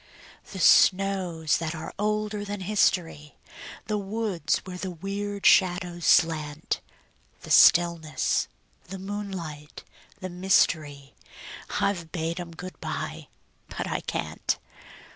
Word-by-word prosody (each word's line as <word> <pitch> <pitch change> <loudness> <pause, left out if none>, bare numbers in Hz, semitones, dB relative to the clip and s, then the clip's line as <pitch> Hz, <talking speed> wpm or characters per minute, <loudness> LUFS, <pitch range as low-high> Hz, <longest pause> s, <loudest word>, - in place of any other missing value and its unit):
The 195 - -7
snows 185 -4 +3
that 165 0 -3
are 160 - -7
older 210 0 -1
than 205 -1 -5
history, 180 -6 0 0.5
The 210 0 -1
woods 200 -5 -1
where 180 -1 -7
the 190 - -4
weird 200 +3 -5
shadows 180 -2 +3
slant; 155 -2 +2 0.6
The - - -8
stillness, 170 -3 +4 0.4
the 190 +2 -7
moonlight, 190 -7 -6 0.4
the 185 - -5
mystery, 155 -6 +1 0.7
I've 170 -5 -1
bade 165 0 -3
'em 175 -1 -6
good 180 +2 -9
by - - -5 0.4
but - - -4
I - - -2
can't. - - -2
180 Hz, 110 wpm, -26 LUFS, 160-200 Hz, 0.7 s, stillness